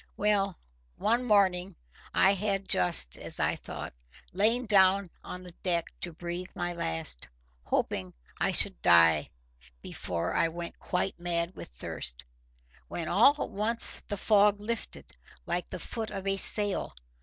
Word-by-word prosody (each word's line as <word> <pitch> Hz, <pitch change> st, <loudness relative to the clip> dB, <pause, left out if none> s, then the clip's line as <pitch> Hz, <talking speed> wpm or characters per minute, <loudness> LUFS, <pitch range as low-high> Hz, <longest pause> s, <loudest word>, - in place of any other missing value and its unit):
Well, 200 Hz, -3 st, 0 dB, 0.4 s
one 235 Hz, +4 st, 0 dB
morning, 195 Hz, -5 st, +1 dB, 0.4 s
I 195 Hz, -, +3 dB
had 195 Hz, -1 st, -3 dB
just, 65 Hz, -9 st, +1 dB
as -, -, +1 dB
I -, -, 0 dB
thought, -, -, -8 dB, 0.4 s
lain 225 Hz, +6 st, +1 dB
down 195 Hz, -3 st, +3 dB
on 180 Hz, 0 st, -9 dB
the 180 Hz, -, -12 dB
deck 170 Hz, -3 st, -2 dB
to 175 Hz, -, -4 dB
breathe 175 Hz, +2 st, -7 dB
my 175 Hz, 0 st, -3 dB
last, 80 Hz, -, -3 dB, 0.4 s
hoping 95 Hz, -1 st, -2 dB, 0.3 s
I -, -, 0 dB
should -, -, +2 dB
die 85 Hz, -2 st, +4 dB, 0.5 s
before 85 Hz, -2 st, -4 dB
I -, -, +1 dB
went 170 Hz, +1 st, -8 dB
quite 180 Hz, 0 st, -3 dB
mad 175 Hz, 0 st, -2 dB
with -, -, -9 dB
thirst, -, -, -6 dB, 0.6 s
when 165 Hz, -, -5 dB
all 230 Hz, -, +4 dB
at -, -, -8 dB
once 220 Hz, +3 st, +1 dB
the 205 Hz, -, -4 dB
fog 205 Hz, 0 st, +3 dB
lifted, 230 Hz, +2 st, -5 dB, 0.3 s
like 175 Hz, +1 st, -3 dB
the -, -, -6 dB
foot 220 Hz, +5 st, -6 dB
of 195 Hz, -, -7 dB
a 195 Hz, 0 st, 0 dB
sail. 200 Hz, -, +7 dB
185 Hz, 145 wpm, -28 LUFS, 170-205 Hz, 0.6 s, sail